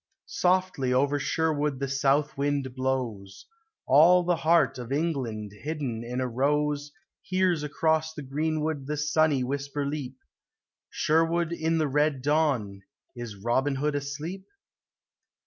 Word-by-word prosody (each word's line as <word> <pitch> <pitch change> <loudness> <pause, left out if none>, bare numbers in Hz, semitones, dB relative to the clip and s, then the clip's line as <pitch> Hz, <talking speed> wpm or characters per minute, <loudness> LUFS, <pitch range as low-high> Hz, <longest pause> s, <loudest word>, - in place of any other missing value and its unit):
Softly 180 -8 +1
over 140 +3 +2
Sherwood 150 -3 0
the 140 - -1
south 140 +2 +1
wind 140 -2 -1
blows; 125 -7 -3 0.4
All 170 +6 +6
the 175 -1 +1
heart 165 -4 +3
of 120 +1 -7
England 130 -9 -2
hidden 135 -2 -4
in 125 +2 -4
a 130 - 0
rose 145 +3 0 0.3
Hears 185 -3 +1
across 160 +1 0
the 150 -2 -8
greenwood 155 0 -2
the 150 0 -2
sunny 150 -2 +2
whisper 140 +2 -3
leap, 140 -3 -4 0.7
Sherwood 165 +2 +1
in 165 0 0
the 155 -2 +1
red 145 -1 +1
dawn, 135 -10 +1 0.3
is 120 -3 -7
Robin 120 +7 0
Hood 150 +2 0
asleep 150 +7 -5
145 Hz, 130 wpm, -27 LUFS, 130-160 Hz, 0.7 s, All